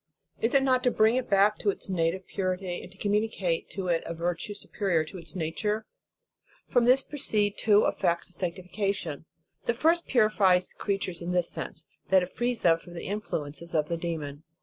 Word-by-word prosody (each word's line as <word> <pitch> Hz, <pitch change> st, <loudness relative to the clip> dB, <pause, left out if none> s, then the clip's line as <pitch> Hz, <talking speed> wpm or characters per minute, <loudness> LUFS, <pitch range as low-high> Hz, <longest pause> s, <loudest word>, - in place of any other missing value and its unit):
Is 230 Hz, +4 st, +1 dB
it 270 Hz, -, +5 dB
not 255 Hz, -2 st, +3 dB
to 250 Hz, -, +3 dB
bring 220 Hz, 0 st, +4 dB
it 255 Hz, -1 st, -1 dB
back 200 Hz, +1 st, +4 dB
to 205 Hz, -, +1 dB
its 195 Hz, -, -3 dB
native 185 Hz, 0 st, 0 dB
purity, 185 Hz, -1 st, -2 dB
and 190 Hz, +2 st, -13 dB
communicate 205 Hz, -5 st, 0 dB
to 190 Hz, -2 st, -3 dB
it 170 Hz, -2 st, +2 dB
a 170 Hz, -, -4 dB
virtue 175 Hz, +4 st, -2 dB
superior 195 Hz, -5 st, 0 dB
to 180 Hz, +4 st, -9 dB
its 165 Hz, +3 st, -6 dB
nature? 210 Hz, +6 st, -2 dB, 0.8 s
From 245 Hz, -2 st, +2 dB
this 260 Hz, +2 st, +5 dB
proceed 210 Hz, -8 st, 0 dB
two 210 Hz, -1 st, +5 dB
effects 170 Hz, -3 st, +1 dB
of 180 Hz, -, -12 dB
sanctification. 180 Hz, -3 st, -3 dB, 0.4 s
.The 235 Hz, -, +1 dB
first 330 Hz, +6 st, +2 dB
purifies 205 Hz, -6 st, +3 dB
creatures 195 Hz, -4 st, -2 dB
in 175 Hz, +1 st, -3 dB
this 175 Hz, -1 st, +1 dB
sense, 160 Hz, -, -5 dB, 0.2 s
that 190 Hz, -1 st, +5 dB
it 180 Hz, -, -6 dB
frees 240 Hz, 0 st, -1 dB
them 165 Hz, -1 st, +5 dB
from 175 Hz, +1 st, -13 dB
the 170 Hz, -, -6 dB
influences 170 Hz, -6 st, -4 dB
of 150 Hz, -1 st, +1 dB
the 170 Hz, -, -1 dB
demon. 155 Hz, -4 st, -4 dB
190 Hz, 185 wpm, -28 LUFS, 170-215 Hz, 0.8 s, it